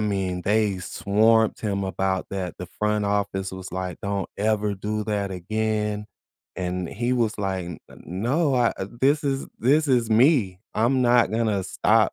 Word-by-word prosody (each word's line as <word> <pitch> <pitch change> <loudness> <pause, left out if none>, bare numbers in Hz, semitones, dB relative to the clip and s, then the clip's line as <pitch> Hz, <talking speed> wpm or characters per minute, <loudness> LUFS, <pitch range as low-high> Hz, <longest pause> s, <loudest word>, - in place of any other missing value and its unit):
mean, 95 -4 -1
they 105 0 +2
swamped 105 +5 +2
him 100 -2 -1
about 95 0 -1
that, 95 -3 -4
the 90 - -6
front 105 0 +1
office 100 -2 -1
was 95 0 -8
like, 95 -1 -4
"Don't 100 -1 -2
ever 105 -1 +1
do 105 +2 -3
that 100 -2 -1
again." 105 +2 -2 0.5
And 90 -1 -2
he 120 +4 -1
was 115 -3 0
like, 95 -2 -2
"N 85 -3 -7
n - - -14
no, 130 - 0
uh, 120 -2 +3 0.3
this 145 +3 +3
is 135 -1 -1
this 145 +5 +3
is 120 -4 +2
me. 110 - +4
I'm 120 +4 +2
not 120 -4 +4
gonna 110 -3 0
stop, 95 - +2
105 Hz, 165 wpm, -24 LUFS, 95-115 Hz, 0.5 s, me